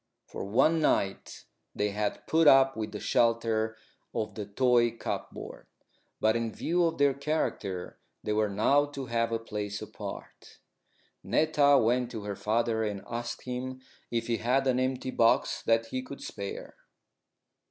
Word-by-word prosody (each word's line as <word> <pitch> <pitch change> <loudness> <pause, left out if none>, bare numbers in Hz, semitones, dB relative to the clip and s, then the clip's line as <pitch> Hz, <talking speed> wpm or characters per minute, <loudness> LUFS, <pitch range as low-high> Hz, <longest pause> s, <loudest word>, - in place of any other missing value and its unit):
For - - -7
one 140 +11 +3
night 100 -9 0 0.3
they 105 0 0
had 105 0 -2
put 160 -1 +3
up 135 -1 +6
with 110 -1 -4
the 105 - -6
shelter 115 -1 +1 0.4
of 110 - -2
the 105 -2 -6
toy 120 +2 +3
cupboard. - - -6 0.5
But 110 +1 +3
in 115 -1 -1
view 175 +9 0
of 165 0 -1
their 140 -1 +4
character 135 - -3 0.2
they 105 - -1
were 105 0 +1
now 135 +9 +3
to 140 -2 -6
have 115 -1 0
a 115 - +1
place 105 -2 -5
apart. - - -9 0.7
Netta 145 -2 +4
went 125 0 +2
to 110 -4 -6
her 100 -1 -4
father 110 +1 0
and 105 -2 -3
asked 120 0 -5
him 130 +1 -5 0.3
if 115 -1 -1
he 115 -1 0
had 125 +5 +1
an 130 -1 +2
empty 130 0 -1
box 115 -2 +2
that 115 0 +3
he 130 - -2
could 140 +2 -9
spare. 100 -1 -7
115 Hz, 155 wpm, -29 LUFS, 110-130 Hz, 0.7 s, up